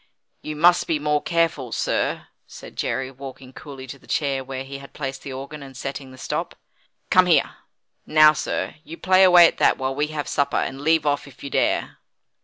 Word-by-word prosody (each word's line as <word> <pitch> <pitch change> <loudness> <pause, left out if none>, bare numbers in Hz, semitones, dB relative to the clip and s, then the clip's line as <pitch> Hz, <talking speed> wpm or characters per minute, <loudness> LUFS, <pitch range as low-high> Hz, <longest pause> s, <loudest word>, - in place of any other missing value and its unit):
"You 155 - -6
must 175 +3 +4
be 160 - +1
more 150 0 0
careful, 165 -7 0
sir," - - -1 0.2
said - - -12
Jerry, 135 0 -2
walking 130 -1 -11
coolly 135 -2 -10
to 135 +1 -10
the - - -22
chair 140 -3 -1
where 130 0 -6
he 135 +1 -8
had 140 - -13
placed 135 -2 -5
the 140 - -8
organ, 140 +3 -7
and 135 -2 -11
setting 135 -1 -6
the 130 - -13
stop. - - -4 0.6
"Come 185 0 +5
here. 155 -6 +3 0.5
Now, 155 0 +7
sir, 155 - -3
you 165 - -10
play 185 +1 +4
away 180 -2 +8
at - - -5
that, - - +4
while 130 0 -2
we 145 +2 -1
have 150 -1 -5
supper, 140 - 0
and 135 +1 -2
leave 160 0 +2
off 145 -1 0
if 140 -1 -15
you 140 - -6
dare." - - 0
140 Hz, 205 wpm, -23 LUFS, 135-155 Hz, 0.6 s, away